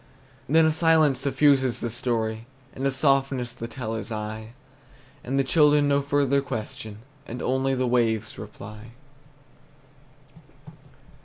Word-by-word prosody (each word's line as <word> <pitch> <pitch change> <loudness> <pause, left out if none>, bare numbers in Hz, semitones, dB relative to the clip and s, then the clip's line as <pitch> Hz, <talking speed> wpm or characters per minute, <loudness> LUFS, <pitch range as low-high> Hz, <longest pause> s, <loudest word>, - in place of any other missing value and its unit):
Then 160 +2 +5
a 160 - +4
silence 155 -4 +3
suffuses 135 -2 +2
the 120 - -3
story, 115 -2 -2 0.3
And 135 +1 -2
a - - +1
softness 135 -2 +1
the 115 - -6
teller's 115 -2 -5
eye; 110 +1 -5 0.7
And 135 +2 -2
the 135 - +3
children 150 +1 +4
no 140 0 +2
further 140 -1 +1
question, 110 -3 -7 0.2
And 120 - -6
only 130 +1 0
the 130 0 0
waves 115 -3 0
reply. 105 +2 -10
130 Hz, 125 wpm, -25 LUFS, 110-140 Hz, 0.7 s, Then